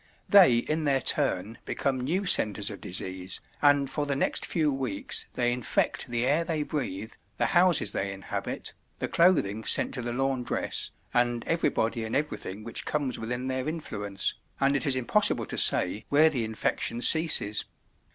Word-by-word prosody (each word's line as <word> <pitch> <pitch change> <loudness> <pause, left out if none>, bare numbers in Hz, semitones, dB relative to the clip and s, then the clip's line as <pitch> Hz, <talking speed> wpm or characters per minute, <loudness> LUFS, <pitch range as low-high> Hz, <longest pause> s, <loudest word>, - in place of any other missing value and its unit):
They 180 -12 +7
in 155 +6 -1
their 135 -2 +2
turn 115 -7 0
become 135 -2 -2
new 175 +10 -1
centres 105 - +3
of 100 - -9
disease, 95 +1 -4 0.2
and 145 -1 +4
for 145 +2 -3
the 140 - -1
next 135 - 0
few 155 -4 0
weeks 125 -7 0
they 120 -1 +1
infect 125 -3 -1
the 120 0 -1
air 150 +5 +2
they 160 -2 -2
breathe, 110 -8 -4 0.3
the - - +1
houses 175 - +4
they 100 0 -2
inhabit, 95 -1 -5 0.2
the - - -3
clothing 130 - +2
sent - - +2
to 125 - -3
the 120 0 -4
laundress, 130 0 -1 0.2
and 120 -1 +1
everybody 115 -8 0
and 110 - -4
everything 110 -8 -3
which 115 - -3
comes 140 -5 -2
within 125 +3 -4
their 130 +2 -2
influence, 105 -11 -3 0.3
and 140 +1 +2
it 140 - 0
is 135 - +3
impossible 130 - +2
to - - -6
say 95 +4 +2
where 155 +2 +5
the 120 -6 -1
infection 110 +1 -1
ceases. 155 -7 +3
130 Hz, 165 wpm, -27 LUFS, 110-150 Hz, 0.3 s, They